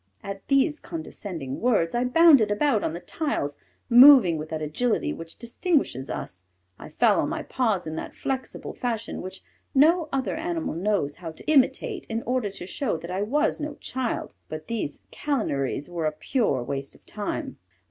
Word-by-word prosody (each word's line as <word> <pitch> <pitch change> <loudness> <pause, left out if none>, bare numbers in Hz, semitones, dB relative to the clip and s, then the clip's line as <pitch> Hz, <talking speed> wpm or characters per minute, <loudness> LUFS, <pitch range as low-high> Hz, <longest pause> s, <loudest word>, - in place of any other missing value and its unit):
At 195 0 -7
these 285 +3 +3
condescending 180 - -6
words, 210 -9 +2
I 240 +1 +1
bounded 275 -4 +6
about 215 +1 +2
on 155 - -1
the 170 - -5
tiles, 175 - -3 0.3
moving 245 - +8
with 155 +1 -6
that 160 - -3
agility 215 +11 0
which 165 0 -9
distinguishes 235 - -1
us; 90 +1 -5 0.4
I - - -9
fell - - +3
on - - -1
my - - -3
paws 220 -9 0
in 155 0 -5
that - - -6
flexible 265 -1 -4
fashion 230 -2 -3
which 185 +1 -8 0.3
no 315 +3 +5
other 270 -1 -1
animal 330 - -2
knows 175 -4 0
how 170 -3 -6
to - - -14
imitate 310 - +2
in 225 0 -2
order 250 -3 0
to 195 -2 -9
show 210 - -2
that 170 +3 -8
I 190 +2 -1
was 295 +12 +1
no 300 -1 -4
child. 255 -4 -3 0.2
But 155 0 -6
these 210 -10 -4
calineries 145 - -1
were 170 -3 -2
a - - 0
pure 155 - 0
waste 135 +1 -5
of - - -22
time. - - -4
220 Hz, 175 wpm, -26 LUFS, 165-275 Hz, 0.4 s, moving